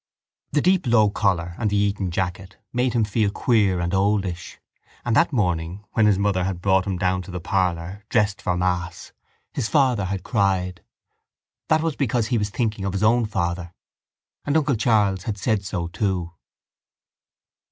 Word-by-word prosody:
The 145 - +2
deep 185 -5 +2
low 110 -3 +4
collar 90 -5 0
and 110 -3 +1
the 105 - -1
Eton 100 -2 0
jacket 95 +3 -4 0.2
made 125 0 +1
him 115 -2 +2
feel 105 0 +1
queer 100 -4 +2
and 85 +1 -2
oldish: 95 -3 0 0.5
and 120 -2 +1
that 165 - +4
morning 90 - -1
when 110 -2 +3
his 100 -3 +4
mother 100 -2 +1
had 95 -1 -2
brought 95 +1 +2
him 95 -2 -1
down 90 0 0
to 95 - -12
the 90 0 -4
parlour, 90 +1 -1
dressed 105 -1 +1
for 90 -3 -1
mass, 90 -1 -2 0.4
his 120 -5 -2
father 130 -9 +2
had 95 -1 -3
cried. 95 -4 0 0.9
That 160 0 +3
was 165 -3 -1
because 120 -4 0
he 120 -3 +1
was 105 0 -1
thinking 105 -2 -2
of 95 -1 -2
his 100 +1 -1
own 115 +1 +3
father. 85 -3 -3 0.7
And 145 +2 +1
uncle 150 -3 +2
Charles 105 -5 +2
had 105 -3 -3
said 105 0 0
so 90 -3 -3
too. 90 -1 -2
100 Hz, 175 wpm, -23 LUFS, 90-110 Hz, 0.9 s, low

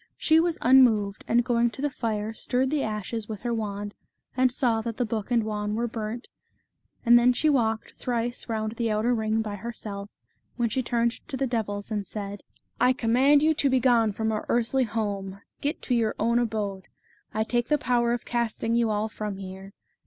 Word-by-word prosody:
She 315 0 +4
was 335 0 +1
unmoved, 225 -6 +4
and 240 +1 +3
going 240 -1 +2
to 230 - -11
the 290 - 0
fire, 220 -3 -2
stirred 255 +4 0
the 300 -2 +1
ashes 215 0 -3
with 215 -2 -5
her 240 -1 -1
wand, 205 -2 -3 0.4
and 255 0 +3
saw 235 -4 +1
that 230 0 -5
the 245 - +1
book 215 -1 -3
and 235 -2 +2
wand 210 -1 -2
were 235 +2 0
burnt, 225 +1 -5 0.8
and 240 0 +8
then 245 +1 +4
she 310 +5 +2
walked 225 -5 0
thrice 240 0 -3
round 220 -1 -1
the 230 -2 0
outer 215 +3 +1
ring 220 -1 0
by 205 -1 -5
herself, 205 -2 -6 0.5
when 240 -2 0
she 260 - 0
turned 235 -1 +1 0.2
to 265 - -4
the 270 - 0
devils, 215 -4 -3
and 205 -2 -2
said: 205 -1 -6 0.2
" - - -22
I 255 - +5
command 260 +5 +4
you 315 +1 +4
to 285 -2 +1
be 260 0 +3
gone 235 -4 +3
from 220 +2 -1
our 215 - -3
earthly 240 +2 +2
home, 200 -3 -3 0.2
get 290 +2 -2
to 250 - -1
your 225 -3 +1
own 235 +2 +2
abode. 210 -5 -2 0.5
I 220 - 0
take 240 +1 0
the 300 - +3
power 240 -3 +1
of 240 0 -2
casting 230 -1 -1
you 235 -1 +2
all 210 0 0
from 210 -2 -5
here. 190 0 -9
230 Hz, 205 wpm, -26 LUFS, 215-245 Hz, 0.8 s, and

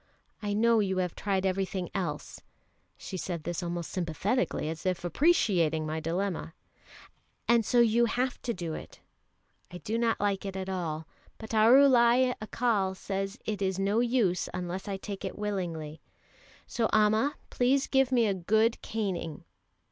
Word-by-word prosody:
I 205 -1 -2
know 230 +2 +4
you 190 -2 0
have 180 -2 -1
tried 195 -2 -1
everything 190 -1 -1
else" 170 -7 -4 0.6
(she 190 - -6
said 170 -3 -4
this 175 +2 -3
almost 170 -1 -4
sympathetically, 180 - -1
as 160 0 -5
if 185 -1 -1
appreciating 175 - +2
my 155 +1 -2
dilemma), 170 +1 -3 0.9
"and 235 -1 +4
so 240 +3 +3
you 235 +1 +4
have 250 +2 -1
to 240 - -2
do 175 -6 -4
it. - - -9 0.7
I 180 - -8
do 225 +4 -3
not 230 -1 +1
like 200 -1 0
it 195 -1 -5
at 190 0 -4
all, 165 -4 -3 0.3
but 220 - -9
Arulai 250 +2 +6
Accal 215 -4 0
says 195 +2 -4
it 210 -2 -3
is 190 -1 0
no 200 +3 +1
use 235 -7 +1
unless 180 +2 -4
I 195 -1 -2
take 195 0 -7
it 190 - -5
willingly, 170 -7 -4 0.6
so 230 -2 -1
Amma, 215 +6 +3 0.2
please 265 +2 +2
give 270 -1 +2
me 240 -3 +4
a 200 - +2
good 220 +5 +1
caning." 185 -8 -3
195 Hz, 155 wpm, -29 LUFS, 180-230 Hz, 0.9 s, Arulai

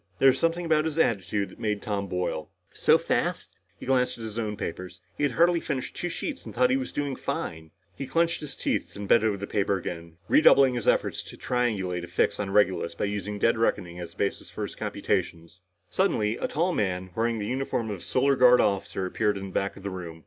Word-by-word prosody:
There 135 - +6
was 130 - +1
something 165 +1 +1
about 155 -1 +2
his 160 -1 -3
attitude 105 - +1
that - - -16
made 105 -3 -1
Tom 100 -3 -3
boil. 90 -4 -3 0.2
So - - +4
fast? - - -2 0.2
He - - -8
glanced 125 -1 +1
at 115 - -8
his 110 0 -5
own 105 -2 -3
papers. 90 -1 -6 0.2
He - - -7
had 145 -3 +2
hardly 170 +3 +4
finished 140 -5 -4
two 175 - -3
sheets 270 - -4
and - - -10
thought 125 +1 +4
he - - +4
was 130 -1 -2
doing 145 -2 -2
fine. 80 -8 -4 0.3
He 135 - -5
clenched 170 +4 +1
his 150 - -7
teeth - - -2
and 100 0 -6
bent 115 - +5
over 105 -2 +1
the 100 - -5
paper 100 -1 0
again, 85 -2 -7
redoubling 140 - +6
his 120 -3 -3
efforts - - +2
to - - -12
triangulate 100 -8 -1
a - - -6
fix 85 - 0
on 100 -2 -2
Regulus 95 -4 +2
by - - -1
using 105 0 -3
dead 115 +2 +2
reckoning 90 -6 0
as 85 -1 -8
a - - -29
basis 100 - -2
for - - -5
his - - -5
computations. 85 +1 -3 0.3
Suddenly 110 - +1
a - - -2
tall 175 +4 0
man, 95 - -1
wearing 115 0 0
the 105 - -3
uniform 125 -2 -2
of 100 - -4
a - - -12
Solar 140 +2 +2
Guard 125 -1 +6
officer, 100 -1 0
appeared 105 +2 0
in 95 0 -6
the - - -13
back 100 - -1
of 100 - -12
the 100 - -3
room. 85 -3 -7
105 Hz, 230 wpm, -27 LUFS, 95-130 Hz, 0.3 s, There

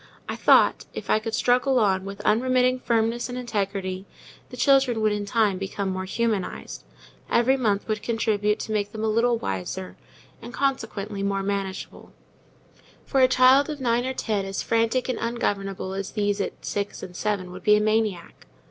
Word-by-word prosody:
I - - -3
thought, - - +4
if - - -4
I - - +4
could 220 +1 -3
struggle 255 +2 +2
on 195 -4 +2
with 200 0 -7
unremitting 255 +2 +2
firmness 230 0 0
and 245 - -5
integrity, 195 -5 -3 0.4
the 250 - -10
children 265 -3 +3
would 215 -1 +2
in 205 0 -2
time 205 -3 +1
become 195 0 -3
more 185 0 -4
humanized: 215 -1 -3 0.5
every 245 +3 +3
month 210 -6 0
would 215 -1 -2
contribute 215 -2 0
to - - -5
make 205 -1 -1
them 220 0 -5
some 220 -1 +1
little 235 +1 +2
wiser, 95 - -4 0.5
and, 235 +1 -9
consequently, 220 -7 -2
more 195 0 -1
manageable; 195 -1 -4 0.9
for 270 - 0
a 255 - +7
child 260 +3 +5
of 300 -1 -5
nine 245 -1 +1
or 260 - -2
ten 210 -5 -1
as 195 0 -4
frantic 230 +2 +1
and 255 - -2
ungovernable 195 -5 -2
as 195 0 -4
these 205 -1 0
at - - -5
six 205 0 -3
and 180 - -8
seven 195 -3 -2
would 185 +1 -9
be 210 +3 +5
a - - +3
maniac. 215 - -1
215 Hz, 175 wpm, -25 LUFS, 195-240 Hz, 0.9 s, a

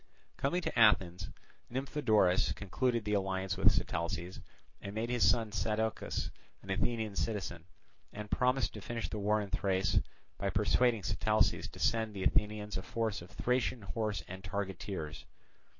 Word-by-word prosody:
Coming 175 +7 0
to - - -1
Athens, 95 -5 +4 0.4
Nymphodorus 115 -8 +2
concluded 115 +3 -1
the 105 - 0
alliance 95 -2 0
with - - +5
Sitalces 85 +2 -2 0.4
and 100 +1 -6
made 115 +2 -1
his 120 -1 +4
son 115 -3 +2
Sadocus 110 +1 -1 0.3
an 95 - -5
Athenian 110 +1 0
citizen, 95 -6 -2 0.5
and 105 0 -7
promised 125 +1 +2
to 105 - -7
finish 115 +2 -4
the 105 - -4
war 105 +1 +2
in 100 -2 -5
Thrace 95 +1 +2 0.4
by - - 0
persuading 120 -5 +2
Sitalces - - +2
to - - -12
send 110 -2 +1
the 95 - -3
Athenians 105 0 +1
a - - -3
force 110 -1 -2
of 85 - -11
Thracian 125 -2 0
horse 105 +2 -2
and 95 +1 -8
targeteers. 95 -5 -4
105 Hz, 150 wpm, -33 LUFS, 95-115 Hz, 0.5 s, with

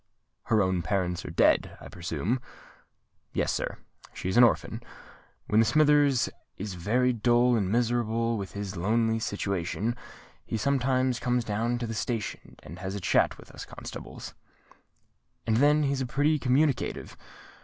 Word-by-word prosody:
"Her 110 -3 +3
own 95 -1 0
parents 90 +1 -1
are - - -5
dead, - - +2
I - - -10
presume?" 85 - -3 0.9
"Yes, - - 0
sir,—she 95 - -6
is 95 - -2
an 120 - +8
orphan. 120 - +2 0.6
When 110 +2 +4
Smithers 145 +1 +4 0.3
is 100 0 -5
very 120 +9 +1
dull 120 +2 +3
and 100 -4 0
miserable 115 0 +1
with 100 -3 -5
his 100 -1 -5
lonely 110 +5 +1
situation, 100 +2 -2 0.5
he 115 - -3
sometimes 130 0 +1
comes 125 -1 0
down 115 +3 -1
to 120 - -3
the 115 - -4
station 115 -1 -4
and 85 +4 -10
has 95 +1 -4
a - - -3
chat 85 - +2
with - - -15
us - - -8
constables; - - -9 1.1
and 110 -1 +2
then 150 +3 +4
he's 140 -1 0
pretty 145 +4 +1
communicative. 135 +2 0
115 Hz, 145 wpm, -28 LUFS, 100-125 Hz, 1.1 s, an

